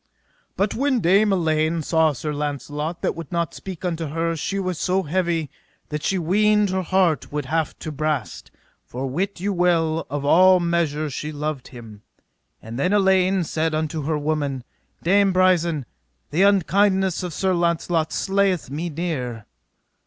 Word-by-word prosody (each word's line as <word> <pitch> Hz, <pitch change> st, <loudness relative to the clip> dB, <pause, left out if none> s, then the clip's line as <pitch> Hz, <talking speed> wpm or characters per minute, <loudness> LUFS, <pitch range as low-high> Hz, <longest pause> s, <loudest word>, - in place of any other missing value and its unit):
But 200 Hz, +1 st, +1 dB
when 270 Hz, 0 st, +1 dB
Dame 200 Hz, +3 st, +4 dB
Elaine 160 Hz, -2 st, +1 dB
saw 160 Hz, 0 st, +3 dB
Sir 150 Hz, +2 st, -4 dB
Launcelot 150 Hz, +3 st, -4 dB
that -, -, +1 dB
would 165 Hz, -3 st, -8 dB
not 170 Hz, -2 st, -1 dB
speak 185 Hz, -2 st, -8 dB
unto 165 Hz, -2 st, -2 dB
her 165 Hz, +3 st, -1 dB
she 195 Hz, +5 st, -3 dB
was 185 Hz, -4 st, -2 dB
so 190 Hz, +1 st, +1 dB
heavy 170 Hz, -2 st, -1 dB, 0.4 s
that 150 Hz, 0 st, -3 dB
she 195 Hz, -, 0 dB
weened 210 Hz, +3 st, +2 dB
her 190 Hz, 0 st, 0 dB
heart 185 Hz, -3 st, +1 dB
would 150 Hz, -1 st, -3 dB
have 160 Hz, +3 st, -1 dB
to 155 Hz, -, -6 dB
brast; 150 Hz, -4 st, -3 dB, 0.3 s
for 130 Hz, +2 st, -5 dB
wit 185 Hz, +9 st, -2 dB
you 200 Hz, +2 st, -1 dB
well, 165 Hz, -3 st, +1 dB
out 140 Hz, 0 st, -3 dB
of 185 Hz, +1 st, +6 dB
measure 165 Hz, -3 st, 0 dB
she 150 Hz, +3 st, -4 dB
loved 150 Hz, -2 st, -4 dB
him. 115 Hz, -5 st, -12 dB, 0.6 s
And 115 Hz, +3 st, -7 dB
then 180 Hz, +8 st, +1 dB
Elaine 190 Hz, -2 st, +3 dB
said 160 Hz, 0 st, -1 dB
unto 155 Hz, 0 st, -2 dB
her 155 Hz, 0 st, 0 dB
woman, 145 Hz, -3 st, -2 dB, 0.4 s
Dame 195 Hz, +3 st, +4 dB
Brisen: 175 Hz, -6 st, +2 dB, 0.5 s
the 160 Hz, +5 st, +1 dB
unkindness 195 Hz, -1 st, +3 dB
of 180 Hz, -1 st, -4 dB
Sir 190 Hz, +3 st, 0 dB
Launcelot 170 Hz, -1 st, 0 dB
slayeth 195 Hz, -7 st, 0 dB
me 160 Hz, +5 st, -3 dB
near. 135 Hz, -9 st, -4 dB
165 Hz, 160 wpm, -22 LUFS, 150-185 Hz, 0.6 s, of